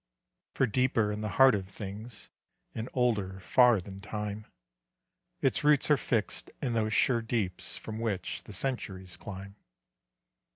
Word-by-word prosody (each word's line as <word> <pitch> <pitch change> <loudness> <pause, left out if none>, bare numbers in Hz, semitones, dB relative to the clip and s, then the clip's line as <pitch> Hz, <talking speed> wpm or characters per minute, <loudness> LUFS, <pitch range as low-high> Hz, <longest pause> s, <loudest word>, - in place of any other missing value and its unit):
For 135 - +3
deeper 115 -2 +2
in 105 0 -4
the 105 - -2
heart 135 -1 +8
of 95 -2 -2
things, 105 +3 -8 0.4
And 115 +2 -4
older 105 -7 0
far 120 +3 +5
than 95 +1 -9
time, 105 +1 -5 1.0
Its - - +2
roots 150 0 +4
are - - +8
fixed 115 -5 -1
in 125 -4 -1
those 110 -1 +1
sure 120 +1 +3
deeps 110 -5 -2
From 110 0 -6
which 100 -6 -2
the 105 - -10
centuries 95 -6 -3
climb. 100 -1 -9
110 Hz, 140 wpm, -30 LUFS, 100-120 Hz, 1.0 s, heart